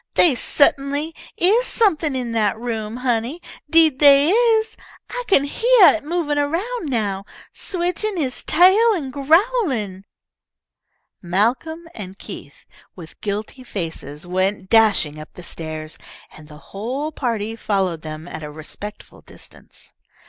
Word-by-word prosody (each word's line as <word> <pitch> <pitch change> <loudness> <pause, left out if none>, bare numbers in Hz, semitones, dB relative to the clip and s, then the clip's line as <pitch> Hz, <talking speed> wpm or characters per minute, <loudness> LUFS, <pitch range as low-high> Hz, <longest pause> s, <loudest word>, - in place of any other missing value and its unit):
They 335 - +5
sut'nly 280 +4 +1 0.2
is 430 +8 +3
something 325 - +1
in 245 -2 -3
that 215 -2 +1
room, 225 -1 -4
honey, 250 +4 -1 0.3
deed 320 -5 +4
they 285 +2 +6
is. 450 0 +2 0.4
I - - -4
kin 280 -8 +4
heah 455 +8 +5
it - - -13
movin' 300 -2 -1
around 335 +6 -2
now, 205 -6 -1 0.3
switchin' 370 +2 -2
he's 270 -5 -3
tail 380 +8 +5
an' 280 -7 -4
growlin'!" 280 - +1 1.2
Malcolm 245 - -1
and 195 -2 -8
Keith, - - -10 0.3
with 165 -3 -13
guilty 215 +5 -4
faces, 165 - -6
went 190 +2 -2
dashing 200 -9 +3
up 155 - -11
the 180 - -10
stairs, 155 -2 -7 0.3
and 155 -1 -14
the 150 0 -13 0.2
whole 255 +10 -3
party 225 -6 -3
followed 195 -7 -1
them 155 +1 -8
at 160 - -7
a 150 - -7
respectful 165 +7 -10
distance. - - -15
255 Hz, 130 wpm, -21 LUFS, 195-330 Hz, 1.2 s, they